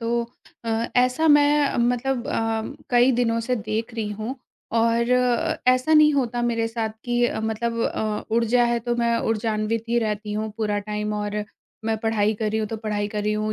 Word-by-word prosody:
तो 235 +1 0 0.4
अ, - - -4 0.3
ऐसा 255 +6 +3
मैं 290 -1 +4
मतलब 245 +1 0
अ, 225 -3 -1 0.3
कई 245 +1 +5
दिनों 230 -1 +1
से 250 +2 -1
देख 220 +2 -3
रही 220 -2 -2
हूँ 215 +5 -4 0.4
और 230 +1 +2 0.6
ऐसा 255 +4 +3
नहीं 305 0 +6
होता 245 -3 0
मेरे 230 -1 0
साथ 225 -1 -2 0.2
कि 240 0 +1
अ, - - -3
मतलब 225 +1 -2
अ, 215 -2 -2
ऊर्जा 235 +1 +3
है 235 0 +1
तो 240 +1 -1
मैं 235 -1 +1
ऊर्जान्वित 220 0 -1
ही 235 +1 +2
रहती 210 -2 -2
हूँ 215 +1 -2
पूरा 210 -2 0
टाइम 210 +1 -3
और 210 0 -3 0.4
मैं 225 0 0
पढ़ाई 220 -1 +2
कर 215 +1 -2
रही 220 - -1
हूँ 215 - -1
तो 225 - -4
पढ़ाई 210 -2 -2
कर 210 0 -3
रही 210 +1 0
हूँ 215 0 -1
230 Hz, 190 wpm, -23 LUFS, 215-240 Hz, 0.6 s, नहीं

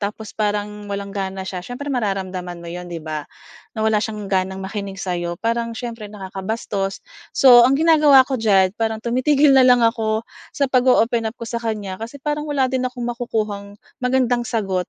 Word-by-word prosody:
tapos 210 +1 -5
parang 210 -1 -2
walang 200 0 -5
gana 190 -1 -4
siya. 185 -1 -5
Siyempre 250 +9 -6
mararamdaman 190 -6 -3
mo 170 - -7
'yon 180 0 -7
'di 165 -2 -7
ba? 155 -2 -5 0.5
Na 220 - -1
wala 220 -1 +3
siyang 210 -2 -5
ganang 190 0 -1
makinig 200 -1 -5
sa'yo, 175 -2 -3
parang 230 +2 -2
siyempre 230 -3 -6
nakakabastos. 195 0 -4 0.3
So, 245 -2 +8
ang 275 - +3
ginagawa 300 -4 +6
ko 260 -4 -3
diyan 195 -4 +4
parang 220 -1 -1
tumitigil 275 +4 +3
na 265 - +7
lang 250 -2 +5
ako 225 -1 0 0.3
sa 280 - +2
pag-o-open 245 -3 +3
up 230 - -10
ko 230 - -7
sa 235 +1 -4
kanya, 210 -4 -4
kasi 230 +5 -7
parang 295 +2 -3
wala 285 -2 +1
din 255 -1 0
akong 250 -1 -7
makukuhang 215 -4 -3 0.2
magandang 250 -1 +1
sagot 190 -5 -1
220 Hz, 175 wpm, -21 LUFS, 195-245 Hz, 0.5 s, So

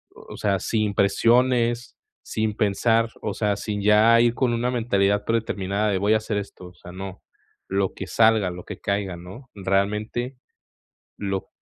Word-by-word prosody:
O - - -11
sea, 100 -2 0
sin 105 0 -1
presiones, 120 +4 +2 0.3
sin 110 -1 -2
pensar, 115 +2 +2
o 105 - -3
sea, 105 -1 0
sin 105 -2 -4
ya 110 +3 +5
ir 120 0 +3
con 125 -1 0
una 120 +2 0
mentalidad 105 -4 +1
predeterminada 105 -2 -1
de 95 - +1
voy 100 +3 +2
a - - +5
hacer 110 -1 -3
esto. 100 -2 -7
O 90 - -14
sea, 90 - -13
no, 95 +1 -8 0.4
lo 95 0 0
que - - -7
salga, 110 -4 +3
lo 90 0 -8
que - - -8
caiga, 100 -2 -2
¿no? 95 +10 -12
Realmente 105 +6 -1 0.8
lo 95 -1 -3
105 Hz, 165 wpm, -24 LUFS, 100-115 Hz, 0.8 s, ya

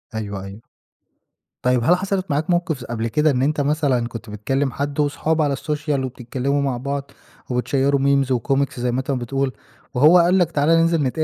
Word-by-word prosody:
أيوه، 100 -3 -4
أيوه. 100 +3 -10 1.0
طيب، 125 -1 +2
هل 175 +7 +5
حصلِت 190 -2 -2
معاك 150 +4 -1
موقِف 175 -4 0
س 120 - -8
قبْل 115 -1 -3
كده 150 +6 +2
إن 125 - 0
أنت 145 +2 +1
مثلًا 140 -5 +1
كنت 115 -1 -9
بتكلِّم 135 +6 -1
حَد 145 +1 -4
وصحاب 155 +2 +1
على 145 -2 +1
الSocial 150 +1 -4
وبتتكلّموا 130 +2 -2
مع 135 -3 -1
بعض 140 +2 -4 0.4
وبتشيروا 135 +3 +1
memes 140 0 +2
وcomics 135 +2 0
زي 125 0 0
ما 125 - -1
أنت 135 +1 -3
ما 130 - 0
بتقول، 135 +2 -2 0.4
وهو 150 +8 +6
قال 175 +2 +4
لك 175 -3 +2
تعالى 150 +2 +3
ننزِل 165 -1 +3
نتقابل 150 +4 0
140 Hz, 190 wpm, -21 LUFS, 125-150 Hz, 1.0 s, وهو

